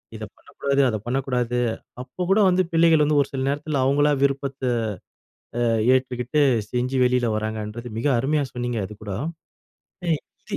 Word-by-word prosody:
இத - - -7
பண்ணக்கூடாது, 140 0 -1
அத 110 - -1
பண்ணக்கூடாது, 125 -1 -1 0.4
அப்ப 130 +8 -5
கூட 205 - +5
வந்து 185 +1 +3
பிள்ளைகள் 165 -2 +5
வந்து 150 0 +3
ஒரு 140 - -1
சில 135 - -2
நேரத்துல 145 -1 -1
அவங்களா 145 +2 +3
விருப்பத்த 140 -1 -1 1.0
ஆ - - 0 0.3
ஏற்றுக்கிட்டு, 125 +1 0 0.3
செஞ்சு 125 +2 -1
வெளில 125 0 +2
வராங்கன்றது 110 +2 -4
மிக 135 - 0
அருமையா 145 +3 +1
சொன்னீங்க 120 -1 -2
அதுக்கூட. 105 -1 -9 1.0
அ - - -1 0.4
இது - - -1
130 Hz, 140 wpm, -23 LUFS, 120-145 Hz, 1.0 s, கூட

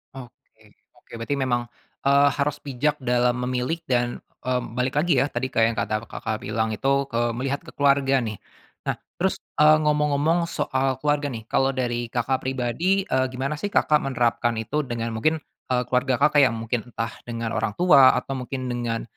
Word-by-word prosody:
Oke 125 -3 -14 0.3
oke - - -25
berarti 115 +5 -2
memang, 120 -3 -1 0.4
eee, 140 +1 +5
harus 145 +1 0
bijak 145 +2 0
dalam 125 -1 +2
memilih 125 +6 -1
dan, 120 -1 0 0.2
mmm, 125 -2 -2
balik 130 +2 -1
lagi 155 -5 +3
ya - - +3
tadi 125 +2 -2
ke - - 0
yang 115 0 +2
kata 110 +1 -1
Kakak 110 +1 -4
bilang 110 +1 -1
itu 135 +6 +1
ke 120 0 +1
melihat 135 +3 -2
ke - - -12
keluarga 140 -1 +3
nih. 105 -3 -4 0.5
Nah - - +1 0.2
terus, - - 0 0.2
eee, 155 +1 +7
ngomong-ngomong 150 +3 +2
soal 130 -4 -1
keluarga 145 0 +1
nih 110 -2 -6
kalau 135 0 +2
dari 120 -2 -1
Kakak 125 +2 0
pribadi, 135 +10 0
eee, 130 -5 +1
gimana 135 +4 -2
sih 205 - -2
Kakak 150 -5 +3
menerapkan 120 -3 0
itu 150 +7 -1
dengan 115 -1 -3
mungkin, 155 +9 0 0.3
eee, 125 -1 +2
keluarga 130 0 +1
Kakak 150 +1 +4
yang 115 -3 +3
mungkin 115 +1 -3
entah 115 0 -3 0.2
dengan 115 -1 -3
orang 105 - -1
tua 145 -7 +6
atau 135 +2 -3
mungkin 130 0 -5
dengan, 120 -1 -2
130 Hz, 180 wpm, -24 LUFS, 120-140 Hz, 0.5 s, eee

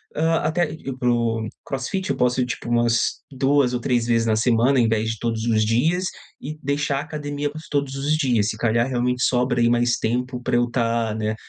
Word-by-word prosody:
hã, 165 +1 +2
até 155 0 0
ir 135 -4 -6
para 125 -1 0
o 115 -2 0 0.2
crossfit, 165 +8 -3
eu - - -1
posso 125 +1 +1
ir, 125 - +2
tipo, 120 -1 -5
umas 120 -1 +1
2 135 -1 +2
ou 125 - 0
3 120 -2 +1
vezes 115 -1 +2
na 110 - +3
semana, 120 +3 +3
em 115 - +4
vez 110 0 0
de 115 - -7
todos 115 -1 -2
os 110 -2 +2
dias, 160 +12 +1 0.3
e 155 +3 -6
deixar 140 0 -1
a - - -2
academia 145 -1 -4
para 155 - -10
os 155 - -10
todos 140 -2 -1
os 145 +3 0
dias, 125 -9 +1
se 110 - -4
calhar, 115 +1 +1
realmente 125 0 0
sobra 125 -1 +1
aí 120 - +4
mais 120 0 +2
tempo 125 +2 -2
pra 125 -1 -1
eu 120 0 +2
tá, 115 -2 0
né, 110 0 -2
125 Hz, 225 wpm, -22 LUFS, 115-140 Hz, 0.3 s, em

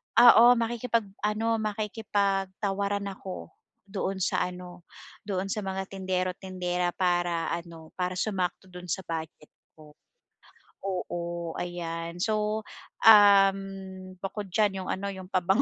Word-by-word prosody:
ah, 240 0 +9
makikipag-ano 225 -1 -1
makikipag-tawaran 200 -2 -1
ako 190 -1 -8 0.4
doon 190 -2 -2
sa - - +1
ano 180 -1 -10 0.4
doon 195 -1 -2
sa 215 - -1
mga 190 -1 -3
tindero 185 -1 -2
tindera 180 -2 -2
para 175 -3 +1
ano 170 -2 -6
para 180 0 -1
sumakto 185 -1 -2
dun 180 0 -9
sa 190 +3 -2
budget 160 -2 -6 0.2
ko 155 -1 -15 0.9
oo 175 -3 -4
ayan 170 -1 -4
so, 215 +2 0 0.4
um, 200 -2 +8 0.6
bukod 195 +1 -5
diyan 195 -1 +1
yung - - -6
ano 200 +1 -2
yung 185 -1 -9
pabango, 190 +1 +2
190 Hz, 115 wpm, -28 LUFS, 175-205 Hz, 0.9 s, ah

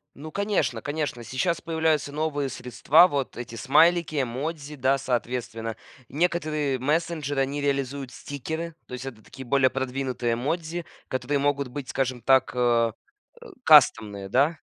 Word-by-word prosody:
Ну, 155 +3 -9
конечно 175 - 0
конечно, 145 -5 -3
сейчас 155 - -1
появляются 160 -3 0
новые 145 -2 -1
средства. 135 +7 +4
Вот 140 -6 -3
эти 120 -1 -7
смайлики, 155 +3 +3
эмодзи, 145 +4 -4
да, 135 +1 +2
соответственно, 120 -3 -3 0.3
некоторые 155 -4 0
мессенджеры, 150 -1 0
они 140 +2 -1
реализуют 140 -2 -2
стикеры. 160 +4 -5
То - - -10
есть 125 +1 -6
это 115 -5 -8
такие 130 -1 -11
более 130 +1 +3
продвинутые 130 -2 -2
эмодзи, 165 +6 -3 0.2
которые 140 +2 -1
могут 140 -1 +1
быть, 130 +1 -7
скажем 130 -2 -1
так, 130 +1 +4
э, 120 -2 +3 0.5
э, - - -11 0.2
кастомные, 105 -9 +5
да? 145 +8 +2
140 Hz, 140 wpm, -26 LUFS, 125-155 Hz, 0.5 s, кастомные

